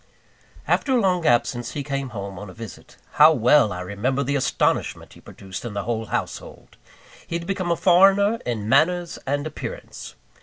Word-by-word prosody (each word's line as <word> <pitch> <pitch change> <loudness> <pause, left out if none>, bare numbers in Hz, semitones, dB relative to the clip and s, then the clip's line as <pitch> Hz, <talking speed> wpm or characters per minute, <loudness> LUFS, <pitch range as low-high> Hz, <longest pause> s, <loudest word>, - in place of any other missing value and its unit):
After 270 - +1
a 250 - +4
long 180 -5 +1
absence, 120 0 +1
he 145 - -4
came 140 -1 -3
home 100 -3 -7
on 105 -1 -9
a 90 - -12
visit. 115 -4 -11 0.2
How 155 +1 +10
well 125 -2 +4
I 90 0 -5
remember 110 +9 -2
the 140 +2 -1
astonishment 135 - -1
he - - -16
produced 95 -1 -9
in 115 -4 -6
the 100 - -2
whole 115 0 -3
household! - - -6 0.5
He 170 - -4
had 170 - -8
become 185 -1 -2
a - - +3
foreigner 195 +5 +4
in 110 -4 -3
manners 170 +7 +2
and 145 +2 -1
appearance. 155 - -8
140 Hz, 180 wpm, -23 LUFS, 110-175 Hz, 0.5 s, How